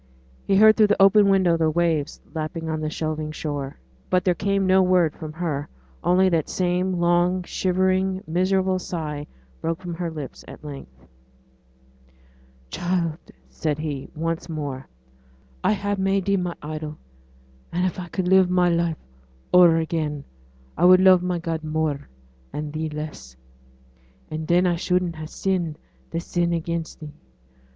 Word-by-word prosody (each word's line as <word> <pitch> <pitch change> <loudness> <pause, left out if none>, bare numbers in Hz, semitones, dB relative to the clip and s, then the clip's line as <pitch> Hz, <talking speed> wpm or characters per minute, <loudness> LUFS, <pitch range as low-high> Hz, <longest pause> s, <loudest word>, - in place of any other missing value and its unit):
He 195 - +3
heard 215 +2 +7
through 215 -2 +6
the 205 - +1
open 200 +1 +6
window 185 -4 +4
the 160 -1 +2
waves 160 -2 0
lapping 160 +1 -4
on 155 -1 -2
the 155 - -1
shelving 155 -1 -3
shore. 145 -3 -4 0.3
But 185 +1 +2
there 180 - +4
came 195 +2 0
no 190 0 +5
word 180 -4 +3
from 155 -2 -7
her; 155 -4 -3 0.3
only 180 +2 +4
that 165 -4 0
same 180 +1 0
long 175 +1 +2
shivering, 185 +1 0
miserable 185 +3 +1
sigh 150 -5 -5 0.3
broke 165 +1 -2
from 180 -2 -6
her 170 0 -3
lips 150 -4 -8
at - - -11
length. 100 - -10 1.7
'Child,' 175 -2 -2 0.2
said 150 -2 -2
he, 150 -3 -4
once 165 +2 -3
more. 145 -4 -5 0.8
'I - - +3
ha' 205 0 -2
made 195 0 +1
thee 200 0 +2
my 180 -2 -2
idol; 155 0 -5 0.7
and 180 +2 0
if 185 - -2
I 180 - -5
could 180 +1 -2
live 190 0 +5
my 180 -1 +3
life 170 -1 +1 0.6
o'er 175 -2 +7
again 155 -3 -2 0.6
I - - +4
would 185 0 +8
love 185 -1 +6
my 180 -1 -1
God 165 -1 -3
more, 155 -2 -2 0.4
and 150 0 -5
thee 155 0 -2
less; 150 - -7 1.0
and 155 0 -4
then 175 +2 +4
I 175 -1 +2
shouldn't 180 -1 0
ha' 155 0 -6
sinned 175 -4 -2 0.3
this 165 +1 -4
sin 175 -1 0
against 165 0 -3
thee. 150 -1 -8
170 Hz, 155 wpm, -24 LUFS, 155-185 Hz, 1.7 s, would